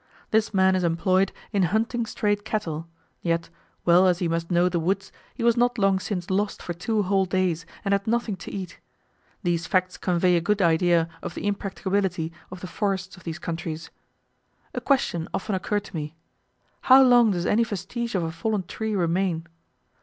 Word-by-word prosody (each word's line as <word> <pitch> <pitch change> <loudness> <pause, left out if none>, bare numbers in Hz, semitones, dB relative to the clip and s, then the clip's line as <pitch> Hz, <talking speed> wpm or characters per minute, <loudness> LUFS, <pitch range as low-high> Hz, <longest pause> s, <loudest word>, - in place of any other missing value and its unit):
This 220 0 +2
man 190 -2 +4
is 185 - 0
employed 185 +3 +2 0.2
in 200 - +2
hunting 225 +6 0
strayed 205 -1 0
cattle; 170 -8 -3 0.3
yet, 165 -1 -1 0.3
well 180 +2 +6
as 180 -2 +3
he 175 - -1
must 165 0 -2
know 175 0 +3
the 175 -1 0
woods, 190 +3 -1 0.2
he 235 - -4
was 235 -1 +4
not 245 0 +2
long 195 -2 +3
since 190 -1 -4
lost 200 +2 0
for 175 - -3
two 210 +5 -1
whole 195 0 +2
days, 180 -2 0 0.2
and 200 - +2
had 200 +1 0
nothing 230 -2 0
to 175 - -8
eat. 190 -2 -6 0.6
These 175 -1 0
facts 185 0 +1
convey 180 0 +2
a 170 - +2
good 210 +4 +1
idea 170 -1 +3
of - - -6
the - - -5
impracticability 190 -4 -1 0.2
of 185 0 -9
the 185 - -5
forests 195 0 -2
of 185 - -17
these 165 -1 -4
countries. 165 -2 -5 0.8
A - - -3
question 175 - +1
often 205 +2 -3
occurred 205 +2 -1
to 195 - -11
me 150 0 -4 0.7
how 265 +1 +8
long 245 -3 +6
does 180 -3 -1
any 230 +3 +3
vestige 225 +3 -4
of 180 - +1
a 165 - -2
fallen 200 +5 -1
tree 215 +4 -3
remain? 175 -2 0
185 Hz, 185 wpm, -25 LUFS, 170-205 Hz, 0.8 s, how